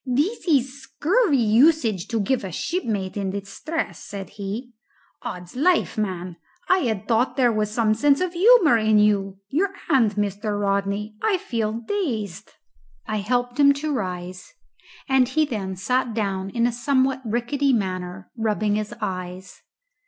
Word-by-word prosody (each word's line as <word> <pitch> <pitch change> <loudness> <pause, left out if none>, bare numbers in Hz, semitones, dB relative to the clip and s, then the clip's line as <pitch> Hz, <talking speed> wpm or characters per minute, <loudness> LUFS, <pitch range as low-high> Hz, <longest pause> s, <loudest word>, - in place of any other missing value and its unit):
"This 295 - -1
is 275 -3 +1
scurvy 350 - +1
usage 230 - +3
to 230 -1 -1
give 235 +4 0
a 190 - -5
shipmate 210 - -2
in 200 -2 -2
distress," 200 - -4
said 195 -1 -7
he. 210 +5 -6 0.5
"'Od's 180 +2 -7
life, 340 +7 +2
man! 185 -5 -3 0.3
I 370 - +4
had 220 - -2
thought 235 +2 +2
there 245 -3 +4
was 215 -1 0
some 220 0 +2
sense 280 +5 +3
of 365 -1 -1
humour 360 - +6
in 215 -1 +3
you. 200 -2 +2
Your 360 - +1 0.2
hand, 230 -7 +3
Mr. 205 0 -2
Rodney; 200 +1 -1
I 420 -3 +2
feel 225 -9 -2
dazed." 225 - -3 0.6
I 215 - -2
helped 245 +4 -1
him 280 0 +7
to 295 +2 -3
rise, 180 -5 -5 0.6
and 265 -2 +4
he 310 +5 +2
then 200 -8 -4
sat 245 +4 -1
down 195 -3 -2
in 235 +3 0
a 245 - +2
somewhat 260 +2 +1
rickety 245 +5 0
manner, 185 -4 -3
rubbing 215 -2 0
his 215 +2 -4
eyes. 185 -2 -5
220 Hz, 150 wpm, -23 LUFS, 200-270 Hz, 0.6 s, him